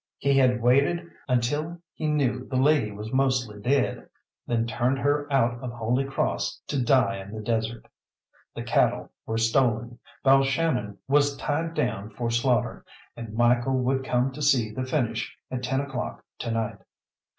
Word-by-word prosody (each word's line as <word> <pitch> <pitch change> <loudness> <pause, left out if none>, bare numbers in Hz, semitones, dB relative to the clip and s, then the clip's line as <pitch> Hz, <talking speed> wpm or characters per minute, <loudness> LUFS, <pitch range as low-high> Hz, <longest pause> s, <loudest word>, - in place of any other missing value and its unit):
He 140 0 +2
had 125 -3 +3
waited 140 +8 +3 0.2
until 145 +7 0
he 155 - -3
knew 135 -4 0
the 130 - -4
lady 130 -4 +3
was 105 +3 -7
mostly 130 -6 +1
dead, 135 +6 0 0.4
then 115 -1 +1
turned 120 +3 0
her 145 +2 0
out 120 -3 +2
of 125 -2 -4
Holy 120 +3 0
Cross 135 - -1
to 140 -4 0
die 120 -6 +3
in 95 +1 -10
the - - -5
desert. 110 +1 -2 0.7
The - - -4
cattle - - +1 0.2
were 110 - -1
stolen, 120 0 +1 0.3
Balshannon 135 -5 +2
was 145 0 +3
tied 165 +3 -2
down 105 -8 -1
for 115 +2 -3
slaughter, 120 +1 +1 0.3
and 115 -2 -8
Michael 120 +2 +3
would 130 +1 0
come 125 0 +1
to 145 +3 -8
see 130 -7 +3
the 130 +4 -3
finish 120 -4 -2
at 130 -1 -3
ten 135 +2 0
o'clock 135 -3 -5
to - - -3
night. 115 -1 -2
125 Hz, 160 wpm, -26 LUFS, 115-135 Hz, 0.7 s, had